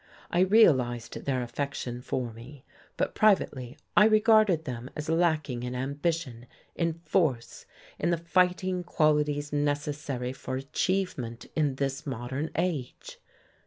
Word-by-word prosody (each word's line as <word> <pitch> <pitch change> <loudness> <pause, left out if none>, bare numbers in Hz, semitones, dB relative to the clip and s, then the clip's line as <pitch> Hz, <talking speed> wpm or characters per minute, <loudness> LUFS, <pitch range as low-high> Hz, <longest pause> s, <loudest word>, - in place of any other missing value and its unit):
I 175 - +1
realized 130 - +4
their 130 -3 0
affection 125 -1 -4
for 125 -2 -3
me; 125 +5 -12 0.3
but - - 0
privately 140 - +2 0.2
I 210 - +7
regarded 215 -6 +4
them 125 0 -5
as 150 +1 -5
lacking 160 -7 +1
in 125 +1 -4
ambition, 140 -2 -2 0.3
in 165 -1 0
force, 150 -7 0 0.3
in 170 - +1
the 170 - +2
fighting 180 +2 +1
qualities 150 -3 +1
necessary 145 -3 -2
for 130 0 -5
achievement 135 -3 -2
in 150 -4 +1
this 140 +2 -3
modern 130 +4 -3
age. 165 -7 -3
145 Hz, 125 wpm, -28 LUFS, 125-170 Hz, 0.3 s, I